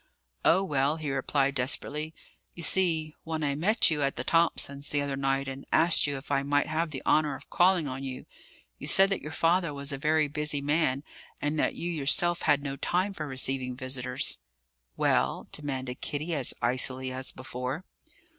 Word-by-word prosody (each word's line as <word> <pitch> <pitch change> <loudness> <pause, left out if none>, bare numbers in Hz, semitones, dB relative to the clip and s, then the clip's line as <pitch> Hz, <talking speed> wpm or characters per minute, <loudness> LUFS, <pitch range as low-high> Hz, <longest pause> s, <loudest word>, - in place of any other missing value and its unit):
"Oh, 185 +4 +4
well," 145 -4 +1
he 155 -3 -4
replied 135 +1 0
desperately: 150 +4 -1 0.4
"you 170 - -6
see, 160 -3 +1
when 160 -1 -4
I 140 -1 0
met 190 +7 +4
you 150 -2 0
at 140 -1 0
the 120 - -3
Thomsons' 145 -3 0
the 145 - +1
other 140 -1 -2
night, 135 0 -1
and 135 0 -6
asked 165 -2 +6
you 145 -1 -2
if 135 +1 -10
I 140 -1 +2
might 145 +1 +1
have 160 +2 -1
the 135 -4 -7
honour 150 -2 +2
of - - -14
calling 175 -3 +3
on 135 0 -5
you, 130 -1 -6 0.5
you - - -7
said 195 +1 +5
that 195 - 0
your 150 - -7
father 165 -1 +1
was 140 +1 -2
a 135 - -5
very 155 0 +2
busy 150 0 -2
man 140 -1 0 0.4
and 150 +1 -2
that - - 0
you 175 - -3
yourself 170 +3 +2
had 145 -2 +2
no 140 -1 -4
time 185 +7 -1
for 155 -5 -5
receiving 130 -1 +1
visitors." 125 - -2 0.6
"Well?" - - +1
demanded 130 -4 -4
Kitty, 150 +4 -2
as 140 -5 +2
icily 130 +1 +2
as 130 +1 -1
before. 130 +6 -6
145 Hz, 185 wpm, -28 LUFS, 135-160 Hz, 0.6 s, asked